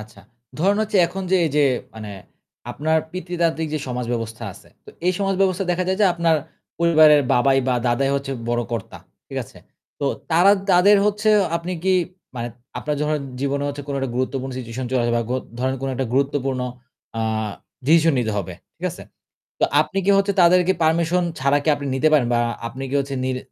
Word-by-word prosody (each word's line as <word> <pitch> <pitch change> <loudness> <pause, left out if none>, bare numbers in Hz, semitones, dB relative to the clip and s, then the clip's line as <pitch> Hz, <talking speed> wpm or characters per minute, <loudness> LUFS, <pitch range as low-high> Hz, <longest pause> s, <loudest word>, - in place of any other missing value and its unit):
আচ্ছা, 110 +1 -13 0.4
ধরেন 195 +5 +3
হচ্ছে 215 -1 -1
এখন 195 +2 -6
যে 190 - +5
এই 160 - 0
যে 145 - +5 0.3
মানে 110 -2 -7 0.6
আপনার 160 +5 +1
পিতৃতান্ত্রিক 170 -3 -1
যে 155 - 0
সমাজ 125 0 -3
ব্যবস্থা 115 -1 -4
আছে। - - -17 0.2
তো - - -12 0.2
এই 185 - +4
সমাজ 195 -1 0
ব্যবস্থায় 190 -1 +1
দেখা 180 +1 -1
যায় 190 +1 0
যে 200 - +6
আপনার 170 -1 +2 0.4
পরিবারের 155 -3 +6
বাবাই 135 +2 +4
বা 125 - +2
দাদাই 135 +3 +1
হচ্ছে 140 0 -2 0.2
বড় 120 0 +1
কর্তা। 115 -4 -5 0.3
ঠিক - - -4
আছে? - - -16 0.4
তো 140 - 0 0.2
তারা, 175 +5 +6 0.2
তাদের 190 +4 +6
হচ্ছে 210 +1 0 0.3
আপনি 170 +2 -5
কি 190 0 +3 0.4
মানে 120 0 -3 0.3
আপনার 150 - -2
ধরেন 150 0 0 0.2
জীবনে 140 +1 -1
হচ্ছে 145 0 -5
কোন 140 - -3
একটা 135 -2 -2
গুরুত্বপূর্ণ 130 +1 -2
সিচুয়েশন 125 +1 -5
চলে 130 -2 +1
যায় 120 - +1
বা 115 - +1
গ - - +1 0.3
ধরেন 130 +1 0
কোন 135 - -2
একটা 130 0 -2
গুরুত্বপূর্ণ 135 -1 0 0.6
আ - - -1 0.7
ডিসিশন 165 +1 +5
নিতে 110 -3 0
হবে। 100 -4 -4 0.2
ঠিক - - -3
আছে? - - -10 0.6
তো - - 0 0.2
আপনি 190 - -4
কি 200 - +5
হচ্ছে 200 0 +2
তাদেরকে 180 +1 +5
পারমিশন 170 +2 +2 0.2
ছাড়া 140 +2 +3
কি 155 - +1
আপনি 140 0 -7
নিতে 135 +4 +3
পারেন 140 -6 +4
বা 120 - +3 0.3
আপনি 130 +3 -7
কি 140 - -2
হচ্ছে 140 0 -3
নিল 130 0 -1
145 Hz, 195 wpm, -22 LUFS, 130-175 Hz, 0.7 s, যে